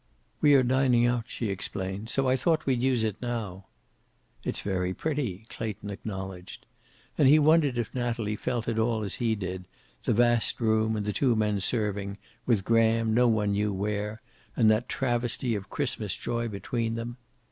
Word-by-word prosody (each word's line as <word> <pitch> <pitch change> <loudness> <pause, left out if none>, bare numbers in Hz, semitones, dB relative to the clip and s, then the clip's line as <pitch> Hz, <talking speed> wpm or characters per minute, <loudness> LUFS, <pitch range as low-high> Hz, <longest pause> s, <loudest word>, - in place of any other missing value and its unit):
"We 145 -1 +6
are 130 - +5
dining 125 -1 +3
out," 120 -2 +1
she 115 - -3
explained. 95 +2 -4
"So 135 +1 +1
I 130 - +4
thought 155 +5 +1
we'd 130 -3 +1
use 125 -3 +2
it 110 -2 -1
now." 110 -6 -4 0.8
"It's - - -2
very 90 -2 -1
pretty," 125 - -2
Clayton 105 -3 -5
acknowledged. 95 -3 -7 0.5
And 140 - +6
he 150 +3 +7
wondered 150 -4 +4
if 120 -3 -2
Natalie 115 -4 -1
felt 120 +2 -3
at 115 -1 0
all 110 -1 +1
as 100 - -4
he 115 -2 +2
did, 90 -2 -5 0.4
the - - +2
vast 120 0 +2
room 110 -1 +2
and 105 -1 -2
the 105 - -1
two 125 0 +2
men 105 -2 +1
serving, 100 -2 -1 0.3
with 110 -6 +2
Graham 115 -1 +3
no 125 +2 +4
one 105 -3 +2
knew 105 +1 +1
where, 105 +3 -3 0.3
and 110 -3 +5
that 110 +3 0
travesty 120 -1 0
of 100 -2 -4
Christmas 115 -8 -2
joy 120 0 -2
between 115 +2 -2
them. 120 +1 -5
115 Hz, 175 wpm, -28 LUFS, 105-120 Hz, 0.8 s, he